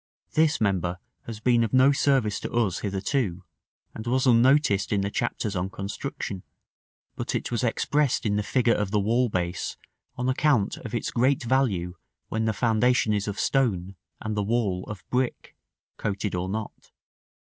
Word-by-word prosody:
This 155 -1 +3
member 90 -4 0 0.3
has 115 -2 -6
been 120 +1 +3
of 115 - -2
no 130 +2 +6
service 135 -7 +2
to - - -5
us 115 -7 +1
hitherto, 100 -1 -1 0.5
and 110 +1 -7
was 130 +2 +2
unnoticed 125 -3 +4
in 100 -2 +2
the 100 +1 -2
chapters 110 -3 -2
on 90 +1 -1
construction; 100 -1 -5 0.7
but - - -3
it - - -2
was 120 +1 -1
expressed 140 +3 +1
in 105 -1 +1
the 105 - +1
figure 120 +2 +2
of 105 -2 -1
the 105 +1 +1
wall 115 +5 +2
base, 90 -2 -2 0.4
on 125 +1 -1
account 130 -5 +2
of - - -6
its - - -2
great 130 +3 +2
value 115 -9 +1 0.4
when 110 0 -1
the 110 - +2
foundation 115 0 +2
is 105 0 -1
of 100 -1 -4
stone 100 -9 0 0.2
and 110 -1 -3
the 105 - 0
wall 100 -4 0
of 105 -2 -8
brick 125 0 -2 0.4
(coated 105 0 -2
or 90 +1 -2
not). 110 +2 -6
110 Hz, 170 wpm, -26 LUFS, 100-125 Hz, 0.7 s, no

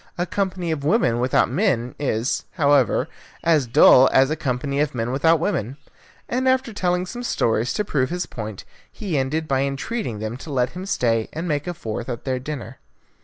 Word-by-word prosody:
A 175 - 0
company 185 -3 -2
of 150 -3 -3
women 145 - +2
without 125 +1 +2
men 130 - 0
is, 125 -3 -1
however, 145 - +3 0.4
as 155 -6 +3
dull 125 +2 +7
as 135 +2 +4
a - - +1
company 140 -1 -2
of 150 -3 0
men 115 +1 -2
without 160 +5 +3
women." 140 - -2 0.5
And 260 +2 +1
after 260 -3 +1
telling 180 -2 0
some 240 +6 -7
stories 120 - 0
to 210 - -1
prove 135 -8 0
his 175 0 -2
point, 110 -3 -7 0.3
he 195 -7 -4
ended 145 +4 -1
by 135 -2 +1
entreating 140 - -3
them 110 +3 -4
to 145 +3 -9
let 125 -2 0
him 185 +2 -7
stay 115 - 0
and 165 +3 -4
make 150 -1 -1
a 175 - -3
fourth 115 -1 -5
at 120 -2 -5
their 130 -1 -1
dinner. 130 -3 -7
140 Hz, 190 wpm, -22 LUFS, 125-175 Hz, 0.5 s, dull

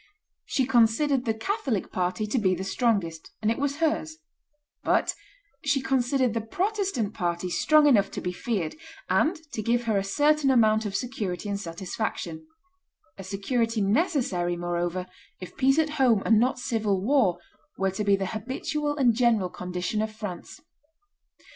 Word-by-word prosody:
She 265 - 0
considered 245 +3 +3
the 225 - +1
Catholic 270 - -2
party 185 +4 -1
to 230 +4 0
be 185 -3 +2
the 185 - -5
strongest, 195 -6 -1
and 215 +1 +1
it 230 - -2
was 285 0 0
hers; 315 0 -1 0.7
but - - +2 0.5
she 280 -1 +2
considered 260 -2 +1
the 230 - -1
Protestant 365 - -1
party 175 0 -2
strong 305 - +4
enough 210 -9 +4
to - - 0
be 180 - -2
feared, 180 -3 -3 0.4
and 325 +4 +3 0.2
to 215 - -3
give 235 +3 +1
her 220 -4 +1
a - - -2
certain 290 +7 +2
amount 220 -4 +4
of 195 - -5
security 205 -5 -3
and 200 0 -2
satisfaction: 200 - -5 0.7
a - - -6
security 225 +4 -1
necessary, 200 - +1
moreover, 175 +1 -2 0.3
if 185 - -9
peace 270 +2 +3
at 310 -1 +2
home, 230 -6 +4
and 220 -2 +5
not 255 +3 +2
civil 220 -5 0
war, 210 -4 +2 0.4
were 195 0 +1
to 190 +3 -3
be 200 -1 +4
the 195 0 -2
habitual 280 +8 -3
and 250 -4 +4
general 225 -5 +2
condition 180 +4 -3
of 220 0 -2
France. 210 - -7
225 Hz, 160 wpm, -26 LUFS, 195-270 Hz, 0.7 s, and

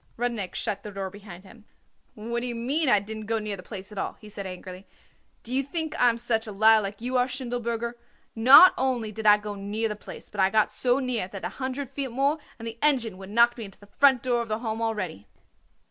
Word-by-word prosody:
Rudnik 230 -6 -2
shut 200 -1 -2
the 210 - -8
door 195 -1 -5
behind 195 -3 -12
him. 210 +3 -17 0.5
"What 235 +2 -3
d'ye 240 0 -3
mean, 270 +6 +1
I 210 - +5
didn't 215 +1 -8
go 225 0 0
near 210 -2 -3
the 185 - -10
place 190 0 -9
at 205 - -6
all?" - - -3
he 215 - -13
said 200 -2 -6
angrily. 185 +1 -9 0.6
"Do 240 - -5
you 265 - +3
think 315 +3 -2
I 245 - +6
am 230 - -1
such 230 -1 -1
a - - -5
liar 220 +2 +5
like 200 +1 -6
you 250 +2 -1
are, 250 0 +2
Schindelberger? 235 -2 -3 0.4
Not 260 +11 +9
only 250 -4 -1
did 215 +1 -3
I 210 0 +8
go 210 0 -6
near 205 +3 -2
the 210 - -4
place, 210 - -11
but 210 - -10
I 190 - +4
got 215 +1 +2
so 250 0 +1
near 255 -7 -1
it 185 - -15
that 195 - -6
a - - -2
hundred 265 +1 -4
feet 275 +1 -4
more 275 +6 0 0.2
and 230 0 -7
the 230 0 -7
engine 245 -10 +1
would 190 0 -10
knocked 235 +3 +4
me 225 - -4
into 195 - -13
the 205 - -16
front 260 +4 +3
door 245 -2 +1
of 235 - -5
the 215 -1 -1
Home 225 -1 -4
already." 185 - -3
225 Hz, 245 wpm, -26 LUFS, 205-245 Hz, 0.6 s, Not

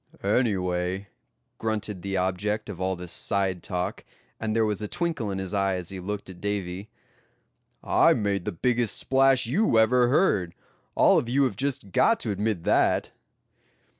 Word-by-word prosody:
"Anyway," 95 -3 0 0.5
grunted 105 -3 -3
the 95 0 -2
object 100 +4 -1
of 95 -3 -7
all 95 0 0
this 90 -1 -8
side 95 -3 -1
talk, 90 0 -3 0.4
and 110 -1 -2
there 115 -1 +3
was 105 -1 -2
a 105 - -3
twinkle 165 - -2
in 95 - -3
his 95 0 -5
eye 100 -1 +1
as 90 -2 -5
he 95 - -6
looked 100 +2 -5
at 90 -2 -11
Davy; 100 -1 -3 0.9
"I - - +4
made 100 -3 -1
the 105 - -1
biggest 120 +4 0
splash 135 -1 +3
you 135 - +2
ever 120 +2 +4
heard; 120 - +2 0.4
all - - +5
of 120 - -5
you 140 +3 +3
have 130 - 0
just 135 -8 -3
got 230 - +3
to 110 - -2
admit 100 -3 -2
that." - - +2
105 Hz, 165 wpm, -26 LUFS, 95-115 Hz, 0.9 s, all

